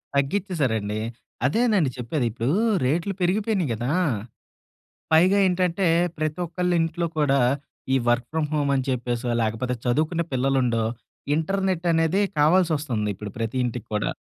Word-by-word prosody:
తగ్గిచ్చేసారండి. 135 - 0 0.5
అదేనండి 205 - +2
చెప్పేది. 125 +2 -2
ఇప్పుడు 120 +6 -1 0.3
రేట్లు 170 +8 0
పెరిగిపోయినాయి 195 - +1
గదా! 120 +4 -2 1.2
పైగా 185 +5 +5
ఏంటంటే 180 0 +1 0.3
ప్రతొక్కళ్ళింట్లో 170 +1 -1
కూడా 140 -2 +3 0.5
ఈ - - +4
వర్క్ 120 0 +2
ఫ్రామ్ 155 -2 -1
హోమ్ 145 -2 +1
అని 130 -1 0
చెప్పేసో, 120 -1 -2
లేకపోతే 115 +3 -1
చదువుకునే 155 +7 +1
పిల్లలుండో, 125 -3 +1 0.5
ఇంటర్నెట్ 185 +1 -1
అనేది 165 +4 +2 0.2
కావాల్సి 170 +3 +4
వస్తుంది 115 -8 -2
ఇప్పుడు 105 +1 -7
ప్రతి 115 +3 -2
ఇంటికి 120 -1 -6
కూడా. 105 - -1
150 Hz, 120 wpm, -24 LUFS, 125-175 Hz, 1.2 s, పైగా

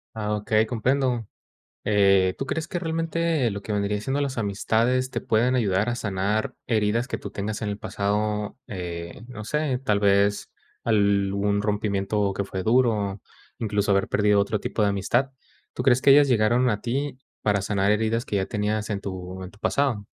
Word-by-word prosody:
Ah, 105 -1 -1
okey, 110 +1 +1
comprendo. 125 -1 0 0.6
Eh, 100 -3 +4
¿tú 135 - -3
crees 160 +3 -3
que 180 - -3
realmente 165 -4 0
lo 100 0 -6
que 105 - -3
vendría 105 0 0
siendo 135 +6 -1
las 135 -3 -2
amistades 115 +5 +1
te - - -3
pueden 120 +4 +2
ayudar 105 -2 +1
a 120 - -1
sanar 105 -1 -1
heridas 110 +1 +1
que - - -3
tú 100 - -8
tengas 105 +2 -4
en 105 - -1
el 100 0 -4
pasado? 105 +1 -1
Eh, 85 0 -6
no 115 -4 -8
sé, 150 0 -1
tal 105 -5 +2
vez, 100 0 +2 0.3
algún 100 -1 +2
rompimiento 105 -1 0
que 100 - -2
fue 95 -1 -5
duro, 110 -3 +2 0.4
incluso 105 -2 -1
haber 100 -1 +3
perdido 105 -1 +3
otro 100 +1 0
tipo 105 - -1
de 105 - +3
amistad, 120 +7 0 0.4
¿tú - - -3
crees 130 -1 +4
que 140 - +5
ellas 145 +1 +7
llegaron 120 +1 +3
a 105 -2 0
ti 135 +3 -2 0.2
para 100 -2 +1
sanar 100 0 +1
heridas 110 +2 +1
que 105 - -4
ya 95 -1 +1
tenías 105 +1 -2
en 100 -1 -2
tu 95 -1 -6
en 95 - -7
tu 105 - -20
pasado? 120 -2 0
105 Hz, 180 wpm, -25 LUFS, 100-120 Hz, 0.6 s, ellas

